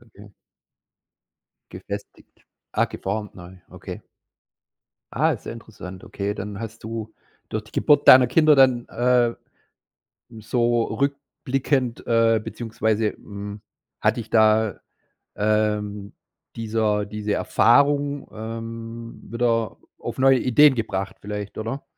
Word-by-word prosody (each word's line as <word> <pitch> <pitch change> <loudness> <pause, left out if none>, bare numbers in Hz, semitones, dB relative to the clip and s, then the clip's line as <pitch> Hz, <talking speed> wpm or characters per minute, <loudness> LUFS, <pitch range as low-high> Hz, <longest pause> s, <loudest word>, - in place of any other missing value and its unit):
okay. 105 -3 -16 1.4
Gefestigt. - - -9 0.3
Ah, - - +2
geformt 105 +1 -5
neu, 90 0 -11
okay. - - -9 1.1
Ah, - - +2
ist - - -6
ja - - -5
interessant, 95 -5 -10
okay. 100 +1 -3
Dann 100 +1 -6
hast 115 -2 -8
du 110 0 -6 0.4
durch 110 -1 -3
die 110 - -19
Geburt 145 -2 +3
deiner 130 -2 +9
Kinder 155 +3 +5
dann, 130 -3 +4
äh, 120 0 +2 1.1
so 120 +1 +1
rückblickend 135 -2 -2
äh, 115 -1 +3
beziehungsweise, 110 -2 -1
hm, 100 0 -9 0.4
hat 110 +2 +2
dich 115 -2 -6
da, 110 -2 +3 0.6
ähm, 105 -1 -1 0.4
dieser 110 -2 0
diese 105 0 -3
Erfahrung, 140 +5 +2
ähm, 115 +1 -7
wieder 115 -2 0 0.2
auf - - -6
neue 135 0 +5
Ideen 135 +3 +5
gebracht 100 -4 -3
vielleicht, 105 0 -6
oder? 115 +6 -4
115 Hz, 110 wpm, -23 LUFS, 105-120 Hz, 1.4 s, deiner